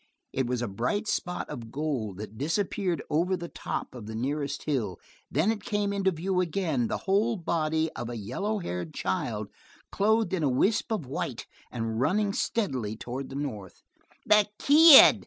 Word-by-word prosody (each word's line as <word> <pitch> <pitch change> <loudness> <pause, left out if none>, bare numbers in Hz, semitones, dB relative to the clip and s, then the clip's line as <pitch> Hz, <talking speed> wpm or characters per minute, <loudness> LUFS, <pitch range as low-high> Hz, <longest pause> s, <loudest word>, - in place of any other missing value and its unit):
It 130 -2 0
was 125 -1 -1
a - - -1
bright 125 - -2
spot 180 -4 -2
of 115 -2 -8
gold 135 -10 -2
that 105 +1 -8
disappeared 175 - -1
over 180 +5 +1
the 170 0 -6
top - - -5
of 120 -4 -9
the 110 - -6
nearest 140 +4 -2
hill; 115 - -2 0.3
then 160 +10 +2
it 215 -2 -4
came 205 -3 -1
into 195 -1 +2
view 180 +2 0
again, 160 -8 0
the - - -2
whole 210 +4 +2
body 160 -3 0
of 120 - -6
a 120 - -5
yellow 165 - -2
haired 90 - -5
child, 105 +2 -2 0.4
clothed 220 +1 +2
in 185 - 0
a 145 - +2
wisp 205 - +1
of 210 -10 -1
white, 130 -2 -4 0.3
and 115 -2 -3
running 200 +7 +2
steadily 130 - -1
toward 130 +4 -5
the 135 - -8
north. 115 -10 -6 0.4
"The 210 -1 +5
kid!" 300 0 +9
155 Hz, 175 wpm, -28 LUFS, 120-195 Hz, 0.4 s, kid